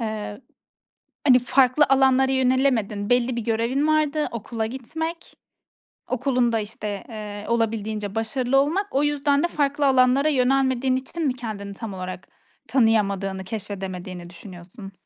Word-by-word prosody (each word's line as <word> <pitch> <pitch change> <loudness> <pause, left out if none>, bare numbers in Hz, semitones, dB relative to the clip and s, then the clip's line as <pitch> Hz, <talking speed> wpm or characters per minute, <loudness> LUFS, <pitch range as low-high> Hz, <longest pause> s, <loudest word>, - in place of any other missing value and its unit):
eee, 215 0 -4 0.9
hani, 255 -2 +7
farklı 255 +3 +3
alanlara 265 0 +4
yönelemedin. 250 -6 +1
Belli 245 0 +2
bir 235 - -2
görevin 235 +6 0
vardı. 305 -1 +1
Okula 225 0 -4
gitmek, 320 +8 -6 0.7
okulunda, 250 -3 +1
işte, 210 -1 -5
eee, 210 -2 -7
olabildiğince 220 -2 -1
başarılı 245 +4 0
olmak. 375 +8 0
O 280 +2 +1
yüzden 290 0 +1
de - - +3
farklı 285 -3 0
alanlara 265 +3 +4
yönelmediğin 260 -1 +2
için 310 +5 -4
mi 255 - +1
kendini 210 -5 -6
tam 210 -1 -7
olarak 185 0 -7 0.4
tanıyamadığını, 200 -5 +1
keşfedemediğini 190 -4 -6
düşünüyorsun? 190 +1 -11
240 Hz, 125 wpm, -23 LUFS, 210-270 Hz, 0.9 s, hani